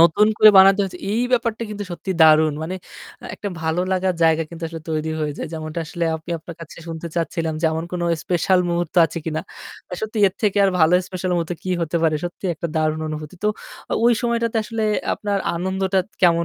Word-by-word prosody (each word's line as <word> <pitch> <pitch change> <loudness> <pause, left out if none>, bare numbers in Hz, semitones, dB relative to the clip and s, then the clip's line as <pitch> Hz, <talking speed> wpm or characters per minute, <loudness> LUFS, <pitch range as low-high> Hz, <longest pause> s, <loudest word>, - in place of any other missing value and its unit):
নতুন 170 +5 +6
করে 215 - +9
বানাতে 195 +1 +7
হয়েছে। 185 -2 -5
এই 230 +3 +1
ব্যাপারটা 230 -2 +1
কিন্তু 205 -1 -5
সত্যিই 180 +1 -4
দারুণ। 155 0 +6
মানে 170 +4 -4 0.5
আ - - -12
একটা 205 - -5
ভালো 160 +2 0
লাগার 185 -1 +1
জায়গা 160 0 +4
কিন্তু 170 0 -10
আসলে 165 0 -7
তৈরি 155 0 -1
হয়ে 150 -1 -1
যায়। - - -4
যেমনটা 155 0 -5
আসলে 170 +2 -3
আমি 160 +2 -8
আপনার 165 +2 -10
কাছে 165 - -10
শুনতে 165 0 -5
চাচ্ছিলাম 165 -1 -1
যে - - -2
এমন 160 +1 -2
কোন 175 - -2 0.2
স্পেশাল 180 +1 +2
মুহূর্ত 170 -2 -2
আছে 170 - -6
কিনা। 160 -1 -2 0.5
আ - - 0
সত্যি 220 +1 -4
এর 185 - -15
থেকে 205 -1 +2
আর 195 - +4
ভালো 160 +2 +5
স্পেশাল 185 0 -3
মুহূর্তে 170 0 -2
কি 185 - -4
হতে 165 +1 -1
পারে? 160 -1 +3
সত্যিই 175 +1 -3
একটা 170 - -4
দারুণ 155 0 +1
অনুভূতি। 155 +2 -6
তো - - +4 0.4
ও - - -1
ওই 240 - +6
সময়টাতে 235 -1 0
আসলে 225 +1 -3 0.3
আপনার 205 -1 -2 0.2
আনন্দটা 190 +2 0 0.2
কেমন 170 -1 +4
175 Hz, 210 wpm, -21 LUFS, 160-195 Hz, 0.5 s, করে